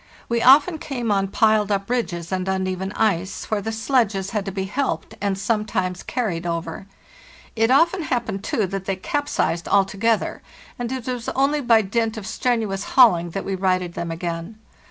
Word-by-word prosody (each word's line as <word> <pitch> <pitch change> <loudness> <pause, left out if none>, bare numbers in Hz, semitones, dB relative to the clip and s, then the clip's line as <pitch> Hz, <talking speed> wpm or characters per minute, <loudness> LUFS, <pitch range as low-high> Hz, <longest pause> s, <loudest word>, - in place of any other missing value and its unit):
We 235 0 0
often 295 +6 +6
came 245 -7 -3
on 195 -1 +2
piled 215 +1 +2
up 195 0 0
ridges 190 -9 -2
and 185 0 -2
uneven 190 0 -2
ice, 190 -3 -1
where 210 -1 +1
the 225 - -3
sledges 220 -4 0
had 210 -3 -2
to 195 - -3
be 190 0 -3
helped 235 +3 -2
and 200 -2 0
sometimes 195 -3 -1
carried 200 -10 -2
over. 170 +2 -4 0.7
It 225 0 +2
often 335 +8 +4
happened, 235 -9 -2
too, 215 - 0
that 195 0 -5
they 195 - -1
capsized 190 - -1
altogether, 200 +3 +1 0.4
and 240 0 -3
it 260 -3 -4
was 245 -3 -3
only 280 +2 +2
by 230 -4 +4
dint 225 +2 -1
of 210 - -6
strenuous 220 -4 -1
hauling 175 -10 +6
that 195 +4 -5
we 195 - -2
righted 185 -2 0
them 170 - -4
again. 170 +4 -5
205 Hz, 175 wpm, -22 LUFS, 190-235 Hz, 0.7 s, often